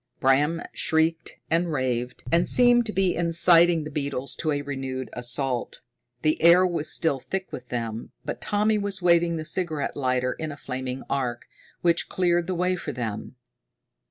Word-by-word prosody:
Bram 145 +5 +2
shrieked 160 0 0
and 170 +1 +1
raved, 125 -3 -2
and 170 +1 +3
seemed 245 -1 +4
to - - -1
be 190 -3 +1
inciting 170 0 +4
the 150 - -7
beetles 140 -2 -3
to 155 - -1
a 145 -1 -1
renewed 130 -3 -5
assault. 125 +1 -2 0.4
The 155 0 +1
air 175 +2 +7
was 165 -4 -1
still 150 -5 +1
thick 190 +8 -5
with 125 0 -8
them, 115 -2 -4
but - - -5
Tommy 210 +1 +1
was 200 -2 -2
waving 170 -1 +3
the 155 - -5
cigarette 155 -3 -2
lighter 125 -2 0
in 160 -1 -5
a 145 - -9
flaming 130 -1 -5
arc, 125 -3 -2 0.4
which 170 -1 +1
cleared 175 -2 +1
the 185 - -2
way 180 +1 +1
for 175 - -5
them. 115 0 -5
155 Hz, 165 wpm, -25 LUFS, 130-175 Hz, 0.4 s, air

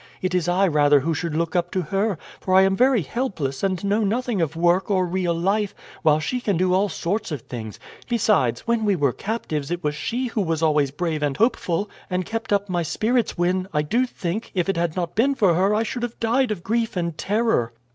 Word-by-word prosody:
It 185 0 -2
is 180 -2 +1
I 185 +3 +3
rather 145 -3 +4
who 165 +4 0
should 160 0 -3
look 165 +2 -1
up 175 0 +1
to 185 - 0
her, 195 +3 0 0.2
for 185 - 0
I 190 - +7
am 195 0 +3
very 250 -3 +3
helpless, 155 - -3
and 190 -2 -1
know 205 +2 +1
nothing 225 -1 0
of 160 -1 -1
work 175 +4 +2
or 185 -2 +2
real 175 -1 -1
life, 195 +4 0 0.3
while 155 -2 +4
she 245 +11 -2
can 205 -7 0
do 180 +1 +2
all 195 +2 +2
sorts 185 +3 -2
of 145 -5 -3
things; 110 -3 -7 0.3
besides, 205 - +2
when 235 -1 0
we 205 -2 +2
were 140 -6 +1
captives 160 -10 -3
it 175 0 -3
was 150 0 0
she 240 +11 -2
who 225 -3 -1
was 165 -3 -1
always 150 -3 +3
brave 155 +2 -2
and 145 -2 -1
hopeful, 205 -4 +1 0.2
and 180 -1 -1
kept 225 -1 -4
up 200 0 +2
my 175 -2 -1
spirits 220 +9 0
when, 185 +2 +1
I 150 - +1
do 240 +12 +1
think, 195 -1 -4
if 180 -1 +1
it 195 - +1
had 170 -1 -1
not 175 -2 -2
been 270 +6 +2
for 195 -9 +3
her 195 +5 +2
I 220 - +2
should 240 +2 -4
have 240 -1 -4
died 245 +3 +2
of 205 -5 -4
grief 225 -2 -1
and 170 -2 -1
terror." 205 - 0
185 Hz, 230 wpm, -23 LUFS, 165-215 Hz, 0.3 s, I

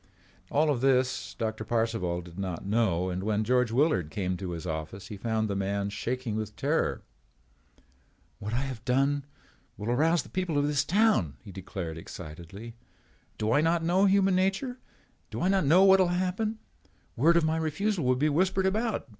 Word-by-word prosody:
All 150 +1 +2
of 125 -4 -1
this, 130 -1 +1
Doctor 110 -1 -3
Parcival 110 -6 -1
did 85 +1 -11
not 95 -3 -4
know 95 -4 +1
and 90 +1 -3
when 105 +1 0
George 125 +1 +2
Willard 115 - +2
came 95 0 -2
to 95 0 -5
his 85 -2 -6
office 80 +5 -5
he 105 - -6
found 110 +1 -1
the 100 - -2
man 100 +1 -1
shaking 120 +2 -3
with 110 -1 -4
terror. - - 0 1.4
"What 105 - -5
I 120 +3 0
have 130 -5 -5
done 135 +3 +1 0.5
will 105 +4 -3
arouse 160 +5 +2
the - - -14
people 185 -5 -2
of 145 - +2
this 145 -1 +1
town," 180 - +2
he 100 - -10
declared 90 -3 -6
excitedly. 85 +8 -9 0.6
"Do 110 +1 0
I 145 - +4
not 165 +1 +2
know 180 +4 +3
human 195 -1 +4
nature? 195 +8 0 0.5
Do - - -5
I 185 - +1
not 190 -4 +2
know 175 +6 +6
what 190 0 +7
will 185 - +4
happen? 185 +5 -1 0.6
Word 165 +7 +4
of 165 - +3
my 160 +1 +1
refusal 165 +4 -1
will 130 0 +3
be 145 +4 +1
whispered 185 +5 +1
about. 215 +1 0
125 Hz, 180 wpm, -28 LUFS, -, 1.4 s, what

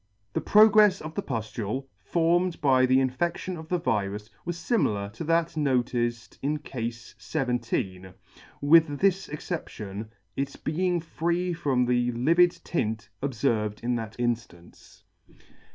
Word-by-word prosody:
The - - 0
progrefs 210 -2 +6
of 155 +1 -7
the 200 - -2
puflule, 115 - -3
formed 170 - +1
by 130 -4 +4
the 130 +1 +4
infedtion 170 +8 -1
of 160 -1 -9
the 180 - +2
virus, 105 - -2
was 175 -1 -3
fimilar 105 - 0
to 165 - -6
that 165 +1 +1
noticed 120 -5 -1
in 150 +2 0
Cafe 125 -5 -4 0.3
XVII. 120 - -2 0.6
with 150 0 +5
this 195 +1 +1
exception, 110 - -5 0.3
its 140 0 -3
being 175 +2 -1
free 170 +2 -1
from 140 -7 +1
the 120 0 +1
livid 165 +9 +4
tint 110 -7 -2
obferved 115 -6 -1
in 120 +1 0
that 110 -2 -4
in 120 -1 +2
fiance. 85 -7 -16
135 Hz, 135 wpm, -27 LUFS, 115-170 Hz, 0.6 s, progrefs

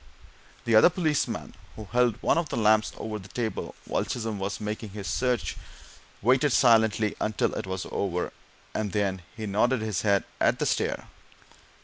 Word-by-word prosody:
The 115 - +1
other 110 +9 +8
policeman, 160 -4 -1 0.2
who 110 - -8
held 120 -2 +3
one - - +3
of 165 -3 -3
the - - -3
lamps 110 -1 +4
over 110 -1 -4
the 95 - -11
table 110 +2 -4
while - - 0
Chisholm 110 -4 -3
was 95 +1 -3
making 105 -1 -5
this 100 -2 -5
search, 125 -2 0 0.7
waited 130 +5 +4
silently 110 -3 +4
until 110 0 0
it - - -4
was 95 -1 -3
over, 90 -3 -2 0.4
and 105 -3 -2
then 100 -3 0 0.2
he 110 - -4
nodded 110 +5 +2
his 105 -5 -1
head 100 -2 +3 0.2
at - - +3
the - - -1
stair. - - 0
110 Hz, 165 wpm, -27 LUFS, 100-120 Hz, 0.7 s, other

